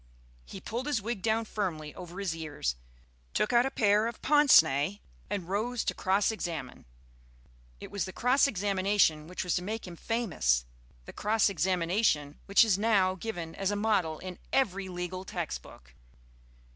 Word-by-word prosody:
He - - -9
pulled 245 +5 -4
his 290 -6 +1
wig 220 0 -4
down 225 +1 +1
firmly 165 -9 -3
over 180 +1 -9
his 190 -5 -2
ears, 150 - -3 0.6
took 210 - +1
out 240 +2 +5
a - - -1
pair 210 -3 +3
of 235 - -6
pince 295 - +7
nez 150 +6 -1 0.3
and 185 -4 -3
rose 225 +5 -1
to - - -1
cross 195 +3 +1
examine. 165 - -5 0.9
It - - -9
was 200 -3 -2
the 185 - -7
cross 250 +8 +3
examination 195 - +1
which 180 +2 -4
was 180 - -1
to - - -2
make 215 +4 -4
him 175 -2 -8
famous, 160 - 0 0.4
the - - -10
cross 210 0 +2
examination 175 -3 0
which 200 +2 +6
is 200 -3 +2
now 200 -4 +3
given 175 -5 -5
as 195 -1 -1
a 205 - 0
model 205 -7 +1
in 185 +1 -8
every 200 -7 +1
legal 180 +1 -5
text 175 -4 -4
book. - - -16
195 Hz, 170 wpm, -29 LUFS, 170-220 Hz, 0.9 s, pince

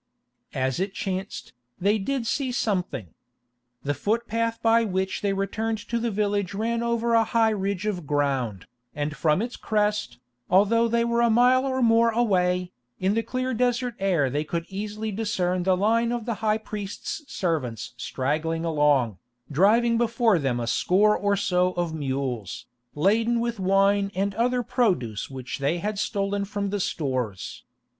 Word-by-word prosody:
As 130 +3 0
it 195 +1 -2
chanced, 190 0 -4 0.3
they 205 +4 +2
did 260 +4 -2
see 260 +2 -1
something. 185 - -2 0.7
The 145 - 0
footpath 230 - -1
by 230 0 +4
which 190 -2 -2
they 200 - +1
returned 210 +3 -1
to 235 - 0
the 235 0 -1
village 205 -2 -1
ran 230 +3 -1
over 235 0 0
a 230 -1 +5
high 225 0 +2
ridge 200 -1 -2
of 180 -8 -3
ground, 135 - -1 0.3
and 150 +1 -2
from 155 +6 +2
its 245 +1 -5
crest, 210 - -1 0.3
although 220 +5 +4
they 235 0 +1
were 235 0 +1
a 235 - +4
mile 250 +3 +4
or 260 -1 0
more 230 0 +5
away, 180 -6 +1 0.3
in 190 +2 +1
that 225 +1 -1
clear 255 0 -2
desert 245 +1 0
air 180 -8 +2
they 145 +3 0
could 165 +2 -3
easily 210 +2 -4
discern 185 -4 -1
the 185 +1 +2
line 230 +4 +2
of 240 -2 -3
the 235 - -1
high 215 -1 +2
priest's 210 +5 -6
servants 125 - -2
straggling 155 +7 -2
along, 145 - +2 0.3
driving 230 +9 +4
before 230 -4 +2
them 130 -4 0
a 120 - -2
score 205 - +3
or 205 0 +1
so 185 -2 +1
of 175 -2 -2
mules, 130 - -3 0.3
laden 225 +9 +2
with 235 -2 -2
wine 195 +1 +3
and 195 +1 0
other 245 +3 +1
produce 190 - 0
which 130 -1 -6
they 140 +5 +1
had 205 +3 -3
stolen 200 -1 -1
from 200 0 -3
the 205 - -1
stores. 130 - -3
200 Hz, 160 wpm, -25 LUFS, 165-230 Hz, 0.7 s, a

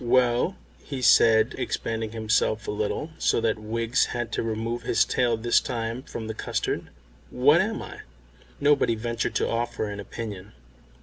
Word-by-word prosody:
"Well," 125 +7 +2 0.3
he 135 -3 -5
said, 110 -2 +5
expanding 110 -1 -2
himself 110 -1 0
a - - -1
little, 105 +9 -2
so - - +2
that 110 -1 0
Wiggs 115 +4 0
had 120 -1 -4
to - - -1
remove 115 +1 -2
his 115 -1 +2
tail 120 -2 +1
this 120 +1 +3
time 115 0 -3
from 115 -3 -7
the 110 - -4
custard, - - -3 0.4
"what 145 +7 +4
am 220 +2 -2
I?" - - -9 0.6
Nobody 140 -5 +3
ventured 115 +1 -2
to - - +1
offer 115 -1 -2
an 100 0 -6
opinion. 100 -2 -7
115 Hz, 160 wpm, -26 LUFS, 110-125 Hz, 0.6 s, said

